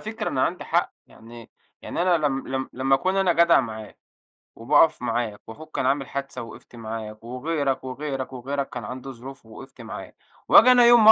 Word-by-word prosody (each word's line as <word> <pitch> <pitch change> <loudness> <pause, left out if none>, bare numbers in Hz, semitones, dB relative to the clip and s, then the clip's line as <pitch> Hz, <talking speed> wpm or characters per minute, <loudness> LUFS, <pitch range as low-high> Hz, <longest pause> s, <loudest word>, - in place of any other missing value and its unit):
فكرة 220 0 -4
أنا 130 - -1
عندي - - -3
حَق، - - 0
يعني 115 0 -14 0.3
يعني - - -3
أنا 180 -1 +3
لم 135 -1 -3
لم 130 0 -3
لمّا 135 +1 +1
أكون 185 +8 0
أنا 190 -3 +3
جدع 170 0 +5
معاك 110 -2 -8 0.6
وباقَف 150 +5 +3
معاك 115 -3 -2
وأخوك 155 +8 -12
كان - - -1
عامل 135 0 0
حادثة 140 -2 -5
ووقفت 115 +1 -12
معاك 110 -1 -7
وغيرك، 135 +2 -2
وغيرك، 135 0 -5
وغيرك، 135 +2 -4
كان 120 - -7
عنده 130 +3 -7
ظروف 130 0 -11
ووقفت 130 +3 -13
معاه 105 -4 -9 0.3
وآجي 255 - +8
أنا 245 -1 +6
يوم 235 -2 +7
ما 220 - +12
135 Hz, 185 wpm, -24 LUFS, 120-155 Hz, 0.6 s, ما